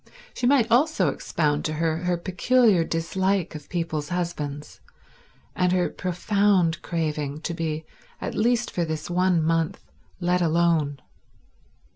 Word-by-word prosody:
She 245 - -1
might 265 -3 +4
also 245 - +3
expound 150 0 -1
to 155 - -1
her 160 0 0
her 180 +1 -1
peculiar 190 +2 +3
dislike 180 +3 -1
of 150 -2 -9
people's 165 -4 -3
husbands, 150 -5 -4 0.8
and 180 -1 +2
her 180 -1 +2
profound 185 -1 +1
craving 150 -3 -3
to 170 - -3
be, 160 -2 -3 0.3
at - - -4
least 240 +2 +1
for 175 - -1
this 160 +1 -4
one 180 -2 +2
month, 165 +3 0 0.4
let 180 0 +1
alone. 165 -4 +2
170 Hz, 130 wpm, -25 LUFS, 160-185 Hz, 0.8 s, might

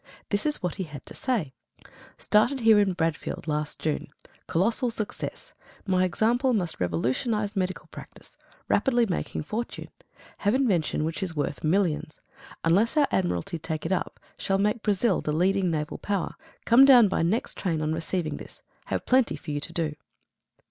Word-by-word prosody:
This 205 +8 0
is 300 - -2
what 180 0 -2
he 190 - -2
had 150 -3 -10
to - - -10
say: 210 - -1 0.6
"Started 235 +6 +2
here 220 -2 +6
in 200 -2 +2
Bradfield 165 -2 -2
last 150 -1 -2
June. 155 -1 -2 0.4
Colossal 230 +8 +1
success. 220 -2 -5 0.3
My 185 -2 +2
example 240 +8 +2
must 180 -6 -2
revolutionise 130 - -1
medical 185 -1 -2
practice. - - -13 0.3
Rapidly 240 -3 +3
making 180 -5 -3
fortune. 225 +9 -5 0.5
Have 205 +4 +2
invention 190 - +1
which 165 +5 -3
is 180 -4 -2
worth 145 -1 -2
millions. 155 -2 0 0.4
Unless 205 - +3
our 290 -2 +5
Admiralty 170 - -1
take 160 0 -4
it 165 - -2
up 185 - -2 0.2
shall 195 - 0
make 210 +3 +1
Brazil 205 -1 +1
the 150 - -2
leading 185 +3 +2
naval 155 -2 -3
power. 200 -4 -2 0.3
Come 240 +3 +7
down 250 -5 +8
by 190 - 0
next 185 +9 0
train 170 -5 -1
on 155 0 -1
receiving 165 0 -2
this. - - -12 0.2
Have - - -3
plenty 255 -1 +3
for 155 - -7
you 145 - -1
to 155 - -6
do." 160 -3 -2
185 Hz, 165 wpm, -26 LUFS, 160-220 Hz, 0.6 s, down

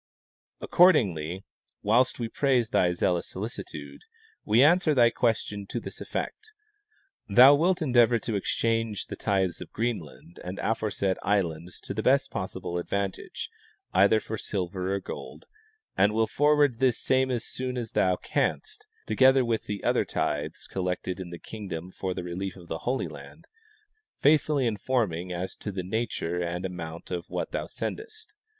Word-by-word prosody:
Accordingly, 95 - +3 0.4
whilst 120 +5 +3
we 120 - -2
praise 125 -2 +1
thy 90 -6 +3
zealous 90 0 0
solicitude, 110 - -7 0.4
we 115 +5 +5
answer 160 0 +4
thy 120 -2 +5
question 105 -4 -1
to 120 - -3
this - - -7
effect: 435 0 -5 0.8
thou 125 +7 +9
wilt 170 +4 +2
endeavor 120 -4 +4
to 115 0 -4
exchange 115 +1 0
the - - -7
tithes 95 -4 0
of - - -9
Greenland 90 - -4
and 90 +2 -6
the - - 0
aforesaid 100 -4 -1
islands 90 -4 -1
to - - -5
the 110 - -2
best 135 +5 +3
possible 95 -2 -4
advantage, 100 +2 -4 0.4
either 100 +4 +5
for 110 0 -6
silver 95 -1 -3
or - - -1
gold, - - -8 0.5
and 105 +1 +3
will 110 0 +3
forward 145 -2 +3
this 130 -3 +3
same 130 0 +2
as 120 -3 -1
soon 125 0 -4
as 115 -3 -4
thou 95 -1 +2
canst, - - -2 0.2
together 130 +4 +5
with 115 -2 -1
the 105 -1 -5
other - - +2
tithes - - -2
collected 90 0 -3
in 90 -2 -6
the 85 - -7
kingdom 95 -4 -7
for 95 -1 -4
the 90 - -4
relief 90 +2 -4
of 90 -3 -14
the 80 - -3
Holy 130 +1 0
Land, - - -12 0.7
faithfully 145 -2 +3
informing 105 -6 -1
as 90 +1 -4
to 105 - -5
the 95 -1 -4
nature 90 -4 -2
and 90 +1 -3
amount 85 -2 -6
of 90 -1 -3
what - - -3
thou - - -3
sendest. 440 0 -6
105 Hz, 155 wpm, -27 LUFS, 90-125 Hz, 0.8 s, thou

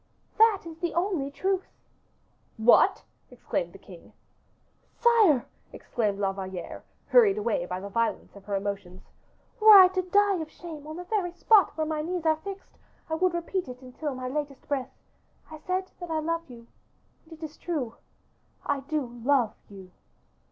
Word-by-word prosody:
"That 440 -3 +5
is 330 -1 -10
the 345 -1 -3
only 345 -6 0
truth." 380 +6 -1 0.9
"What!" 225 +2 +5 0.3
exclaimed - - -3
the - - -13
king. - - -15 0.8
"Sire," 430 - +4 0.3
exclaimed 210 -4 -2
La 195 -1 0
Valliere, 190 -2 -7 0.2
hurried 430 -5 +5
away 475 +3 -1
by 180 - -4
the 200 - -7
violence 230 +1 -2
of 200 -1 -14
her 200 -1 -2
emotions, 195 -2 -5 0.6
"were 430 -1 +10
I 370 -1 +9
to 370 0 -1
die 400 +2 +2
of 315 -2 -5
shame 310 -4 -10
on 310 - -7
the 360 - -6
very 360 -2 -1
spot 370 -3 +4
where 315 - 0
my 310 -1 -2
knees 345 +1 -4
are 315 -1 +3
fixed, 390 +4 -10 0.3
I - - 0
would 350 +2 +1
repeat 350 +1 -3
it 250 +1 -10
until 265 +3 -5
my 255 0 -5
latest 280 0 -5
breath; 275 -3 -2 0.6
I 310 - -9
said 370 +3 -3
that 350 -1 -7
I 320 - -1
loved 330 0 -2
you, 235 -2 -12 0.6
and 320 - -14
it 320 0 -12
is 310 -1 -7
true; 285 -10 -3 0.7
I 285 -1 0
do 295 +1 -2 0.2
love 255 -4 +2 0.2
you." 190 -2 -12
315 Hz, 170 wpm, -27 LUFS, 250-370 Hz, 0.9 s, were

